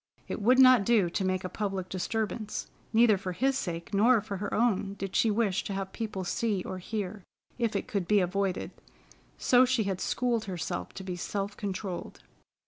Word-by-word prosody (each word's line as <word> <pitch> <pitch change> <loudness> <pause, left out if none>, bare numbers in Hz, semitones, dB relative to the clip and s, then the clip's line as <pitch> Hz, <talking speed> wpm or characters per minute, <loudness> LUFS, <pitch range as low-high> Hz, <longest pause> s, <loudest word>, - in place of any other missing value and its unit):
It - - -4
would 250 +5 +5
not 255 -4 +7
do 200 -5 +3
to 195 - -1
make 185 0 0
a - - -2
public 195 -2 -3
disturbance. 215 +3 -3 0.3
Neither 220 -3 +5
for 185 -1 -4
his 270 +8 +1
sake 170 -5 -4
nor 230 +4 +5
for 205 -1 -5
her 205 +2 -4
own, 205 -4 +1
did 195 -1 -5
she 225 - +4
wish 205 -3 +1
to 200 - -3
have 195 -1 -4
people 215 -4 -4
see 200 +1 -1
or 185 - -5
hear, 200 0 -4 0.4
if 230 -2 0
it - - -2
could 195 -5 -2
be 210 -1 +4
avoided, 190 +1 -1 0.7
so 250 0 +5
she 255 -3 +2
had 195 -2 -2
schooled 240 -3 0
herself 180 -5 -4
to 190 - -6
be 185 -1 -4
self 200 +2 -3
controlled. 195 -2 -5
200 Hz, 190 wpm, -29 LUFS, 185-225 Hz, 0.7 s, not